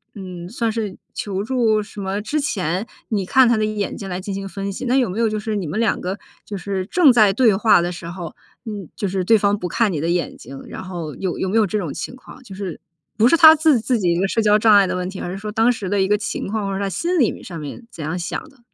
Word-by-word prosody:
嗯， 180 -3 -8
算 230 +3 -1
是 215 -4 -4 0.2
求 195 -1 -3
助 220 -3 +1
什 205 0 -11
么 195 +1 -2
之 290 +9 -1
前， 190 - -1 0.2
你 205 -4 -1
看 260 +6 +5
他 235 - +3
的 215 - +1
眼 215 -1 -3
睛 195 - -7
来 180 0 -4
进 200 +1 -5
行 195 0 -4
分 195 0 -4
析， 195 - -6
那 250 +1 +2
有 255 -6 +2
没 190 +5 -4
有 230 - +3
就 215 - -2
是 215 0 -2
你 185 -5 -3
们 150 - -3
两 230 - +1
个 185 +2 -3 0.3
就 205 - -5
是 190 0 -3
正 315 - +5
在 215 -4 +5
对 220 0 +4
话 215 0 +5
的 175 +1 0
时 170 0 -8
候， 175 -2 -7 0.3
嗯， 205 -6 -6
就 200 - -1
是 190 0 -1
对 225 +5 +5
方 205 0 +2
不 180 -3 -4
看 220 +1 +1
你 150 - -2
的 165 - -1
眼 175 0 -1
睛， 135 0 -10
然 - - -7
后 170 -5 -6
有 185 -3 -3
有 190 - -1
没 190 - -2
有 220 - +5
这 210 +2 -2
种 165 -8 -4
情 - - -6
况。 260 +1 -14
就 215 -6 -11
是 190 -4 -6 0.4
不 225 +2 +5
是 335 - +5
他 315 -1 +10
自 310 -5 +3
自 235 +3 0
己 180 -5 +1
一 170 - +1
个 195 - +2
社 225 - 0
交 210 0 +4
障 215 -1 +6
碍 200 -1 +6
的 180 - -2
问 180 0 -3
题， 190 - -7
而 175 - -4
是 190 - -5
说 210 +2 -6
当 225 +2 +4
时 215 -5 -4
的 200 0 +1
一 190 - +2
个 210 - +4
情 210 - -4
况， 215 0 -2
或 195 - -2
者 195 - -2
他 195 - -1
心 345 - -1
里 245 - +4
面 - - -10
上 175 - -7
面 150 - -8
怎 160 - -8
样 160 +4 -3
想 175 - -4
的。 275 -3 -24
200 Hz, 315 characters per minute, -21 LUFS, 185-225 Hz, 0.4 s, 他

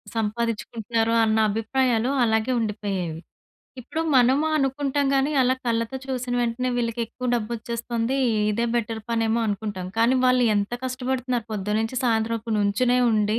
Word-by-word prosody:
సంపాదిచ్చుకుంటున్నారు, 225 0 -1
అన్న 220 0 +2
అభిప్రాయాలు 230 +2 +1
అలాగే 220 +1 +1
ఉండిపోయేవి. 200 -7 -3 0.6
ఇప్పుడు 315 +6 -4 0.2
మనము 260 +5 +4
అనుకుంటాం‌ 280 0 0
గానీ, 275 +2 +2
అలా 255 +1 +3
కళ్ళతో 230 +2 -1
చూసిన 255 -2 -3
వెంటనే 240 +2 -1
వీళ్ళకెక్కువ 235 +1 -3
డబ్బొచ్చేస్తుంది. 235 +2 -2 0.3
ఇదే 230 +3 0
బెటర్ 225 -1 -1
పనేమో 225 0 +1
అనుకుంటాం. 205 -3 -3
కానీ, 235 +3 +4
వాళ్ళు 250 -1 +4
ఎంత 205 +2 -1
కష్టపడుతున్నారు. 255 -2 -2
పొద్దున్నుంచి, 215 +4 -1
సాయంత్రం 230 -1 +1
వరకు 225 +1 -5
నుంచునే 225 +5 +2
ఉండి 215 +1 +1
230 Hz, 125 wpm, -24 LUFS, 220-250 Hz, 0.6 s, మనము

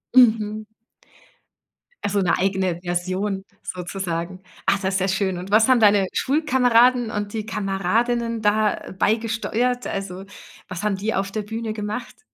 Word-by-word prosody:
Mhm. 215 -3 +4 1.4
Also, 205 0 +1
'ne 180 - +2
eigene 190 -2 0
Version 185 +3 -2 0.2
sozusagen. 180 0 -4 0.2
Ah, - - +4
das 190 0 -1
ist - - +2
ja 190 - +1
schön 190 -1 0
und 185 +3 -7
was 220 +3 +5
haben 255 -2 +5
deine 205 -3 +5
Schulkameraden 250 -5 +3
und 205 0 -3
die 220 -1 -3
Kameradinnen 225 +4 0
da 210 0 +1
beigesteuert? 230 +3 0
Also, 195 -1 -5 0.4
was 185 -3 -6
haben 210 -2 +1
die 210 +4 -2
auf 195 0 -1
der 215 0 -3
Bühne 225 +1 -4
gemacht? 215 +3 -6
210 Hz, 140 wpm, -23 LUFS, 190-225 Hz, 1.4 s, was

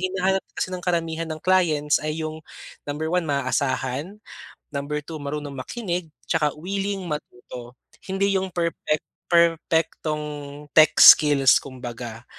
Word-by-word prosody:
hinahanap 190 +1 0
kasi - - -3
ng 180 - -6
karamihan 165 -2 -1
ng 155 0 -5
clients 160 -6 +2
ay 155 +1 -3
'yong, 155 0 -5 0.4
number 150 +2 -3
1, 180 +1 0
maaasahan, 140 +5 -2 0.5
number 145 +1 -3
2, 160 +1 -7
marunong 145 0 -5
makinig, 175 - -4 0.2
'tsaka 150 -3 +1
willing 195 +3 -3
matuto. 125 -4 -8 0.3
Hindi 195 +1 0
'yong 190 - -3
perpek 170 -3 -1 0.3
perpektong 165 -2 +1 0.5
tech 155 0 +6
skills 145 -4 +8
kumbaga, 120 -3 -8
155 Hz, 120 wpm, -23 LUFS, 145-180 Hz, 0.5 s, skills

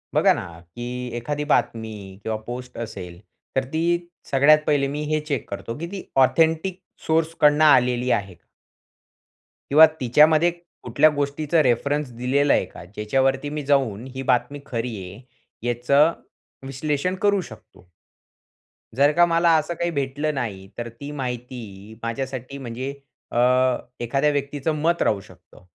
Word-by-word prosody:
बघा - - +5
ना - - -4 0.2
की 90 +8 -9 0.3
एखादी 145 +5 -3
बातमी 110 -1 +1 0.3
किंवा 110 -1 -2
पोस्ट 125 +1 -7
असेल, 90 -7 -7 0.4
तर 135 - +2
ती 160 - 0 0.5
सगळ्यात 145 +3 +6
पहिले 140 -2 +2
मी 145 +2 -4
हे 155 - +2
चेक 140 - -2
करतो 100 +5 -6
की 170 - -4
ती 195 - -6 0.2
ऑथेंटिक 165 +5 +1 0.3
सोर्सकडून 160 -2 +3
आलेली 125 -4 +4
आहे. 100 -3 -1 1.4
किंवा 155 +3 +9
तिच्यामध्ये 155 +7 +4 0.3
कुठल्या 140 +6 +4
गोष्टीचा 145 +3 +1
रेफरन्स 140 +3 0
दिलेला 135 +4 +2
आहे - - +2
का? - - -12
ज्याच्यावरती 135 +8 0
मी 150 -1 -4
जाऊन 130 -6 +1
ही 135 - -4
बातमी 125 +4 0
खरी 115 -2 -3
आहे, 95 +5 -9 0.5
याचं 140 +7 +3 0.6
विश्लेषण 150 +6 -2
करू 205 -2 +3
शकतो? 90 - -14 1.1
जर 140 +2 +4
का 175 0 +6
मला 170 0 +3
असं 155 +3 -2
काही 170 +1 -2
भेटलं 145 +1 -2
नाही, 100 -7 -4
तर 120 0 -4
ती 140 +6 -9
माहिती 120 -6 -6
माझ्यासाठी 130 +3 -4
म्हणजे 130 +1 -5 0.4
अ, - - -3 0.6
एखाद्या 135 +5 +1
व्यक्तीचं 145 +2 -2
मत 170 +2 +1
राहू 105 - +1
शकतं. 90 0 -19
135 Hz, 135 wpm, -23 LUFS, 120-150 Hz, 1.4 s, किंवा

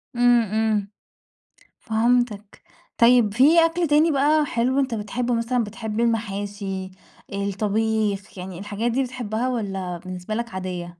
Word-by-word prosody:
إمم، 245 0 +5
إمم 215 -1 0 0.9
فهمتك، 225 -2 0 0.4
طيب 235 -3 +5
في 310 +8 +6
أكل 335 0 0
تاني 300 +3 +4
بقى 295 +2 +3
حلو 255 +1 0
أنت 265 -3 0
بتحبّه، 235 +3 -2
مثلًا 235 +1 0
بتحب 220 0 -5
المحاشي، 205 -4 -2 0.4
الطبيخ، 205 0 -1
يعني 180 -1 -7
الحاجات 210 +4 -2
دي 265 +3 +1
بتحبّها 245 -1 -3
والَّا 195 -7 -3
بالنسبة 185 +3 -7
لك 235 0 -3
عادية؟ 175 -2 -6
220 Hz, 125 wpm, -23 LUFS, 200-245 Hz, 0.9 s, في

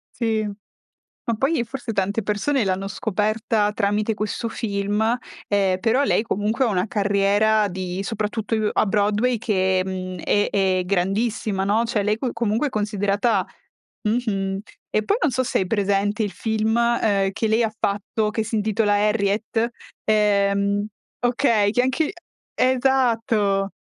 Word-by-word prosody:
Sì, 220 -2 0
ma 205 0 -11 0.6
poi 290 +7 +1
e 235 - 0
forse 245 -1 -5
tante 200 +2 0
persone 210 +5 0
l'hanno 195 +1 -1
scoperta 215 +1 0
tramite 210 +1 0
questo 215 +2 -3
film, 210 +2 -1 0.3
ehm, 195 -2 +2
però 245 +5 +2
lei 215 - +2
comunque 220 +4 0
ha - - +2
una 185 -1 0
carriera 205 +1 +2
di 185 +1 -4
soprattutto 215 +1 -2
u 215 -1 +1
a - - +2
Broadway, 210 +4 +1
che, 190 -4 +1
mhmm, 185 -1 -5
è 205 0 +1
è 190 -2 +2
grandissima, 200 +1 0
no, 215 +4 +2
cioè 220 -3 0
lei 210 +1 +1
co 245 +1 -3
comunque 230 +5 0
è - - -10
considerata 205 -1 0 0.6
mh-mh. 195 -4 -1 0.3
E 215 - +1
poi 410 - +1
non - - +3
so 255 +2 0
se - - 0
hai 185 - -1
presente 205 +1 +1
il 205 - -2
film, 220 +3 -1
ehm, 215 -5 +2
che 220 +2 -1
lei 225 +1 +3
fatto 205 +2 -1
che 220 0 -1
si 225 +1 -3
intitola 210 0 +1
Harriet, 210 +2 +1 0.3
ehm 200 -1 +2 0.4
okay, 235 -4 +2
che 245 - +2
anche 260 +5 +1
uhm, - - -2 0.6
esatto! 225 -6 +1
210 Hz, 150 wpm, -22 LUFS, 200-225 Hz, 0.6 s, non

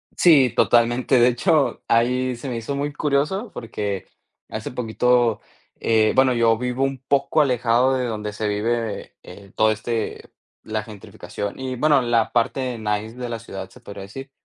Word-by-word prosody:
Sí, 145 -8 +5
totalmente, 120 +2 +3
de 120 - +6
hecho, 150 +4 +1
ahí 125 +2 +2
se 125 +4 -8
me 120 -2 -3
hizo 115 +5 -4
muy 145 +1 -2
curioso 150 - 0
porque 105 -4 -4 0.4
hace 110 +2 -5
poquito, 120 -1 +1 0.4
eh 110 -1 +3
Bueno, 130 -1 +4
yo 115 -1 +3
vivo 125 +2 -2
un 135 -2 -1
poco 140 +2 +2
alejado 125 -1 +2
de 125 - -1
donde 105 -3 -4
se 105 0 -3
vive, 110 +1 -1
eh - - -18
eh, 100 +1 -13
todo 110 0 +4
este 110 +1 -4 0.3
la 110 -1 -3
gentrificación 105 0 -7
y, 130 -1 -4
bueno, 145 +1 +3
la 115 -2 +1
parte 125 +1 0
nice 110 +1 -3
de 125 -1 -5
la 115 -1 -4
ciudad, 95 -4 -8
se - - -17
podría 100 -1 -9
decir. 135 +8 -9
120 Hz, 170 wpm, -22 LUFS, 110-130 Hz, 0.4 s, de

